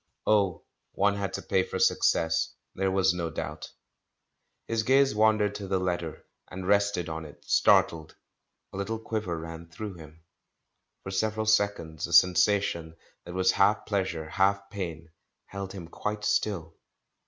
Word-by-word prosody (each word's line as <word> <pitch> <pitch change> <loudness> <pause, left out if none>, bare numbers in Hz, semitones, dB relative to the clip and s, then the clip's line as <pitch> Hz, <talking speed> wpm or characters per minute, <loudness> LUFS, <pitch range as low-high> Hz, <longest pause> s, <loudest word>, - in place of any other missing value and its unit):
Oh, 100 -5 +2 0.3
one 100 +1 +2
had 100 -1 -2
to - - -4
pay 95 - +2
for - - -4
success, 80 0 +2 0.2
there 95 0 0
was 95 -1 +3
no 85 -2 -3
doubt. 75 -1 -6 1.0
His 115 -1 0
gaze 135 +3 +4
wandered 105 -1 +3
to 105 -1 -6
the 95 0 +1
letter, 85 -3 -3 0.2
and 90 0 -6
rested 100 -3 +2
on 80 0 -5
it, 75 -2 -13
startled; 80 -2 +3 0.6
a - - -6
little 110 +3 -2
quiver 110 -6 -3
ran 80 +1 -8
through 100 +5 -6
him. 80 -1 -14 0.8
For 95 - -6
several 110 +3 -1
seconds 100 -8 +1
a 85 - -6
sensation 90 -2 +3 0.3
that 90 - -8
was 95 0 +3
half 100 +1 +2
pleasure, 95 -6 -2
half 100 +3 +1
pain, 85 -5 -6 0.3
held 100 -1 -6
him 90 -4 -8
quite 105 +4 -4
still. 100 -6 -1
95 Hz, 150 wpm, -28 LUFS, 85-105 Hz, 1.0 s, gaze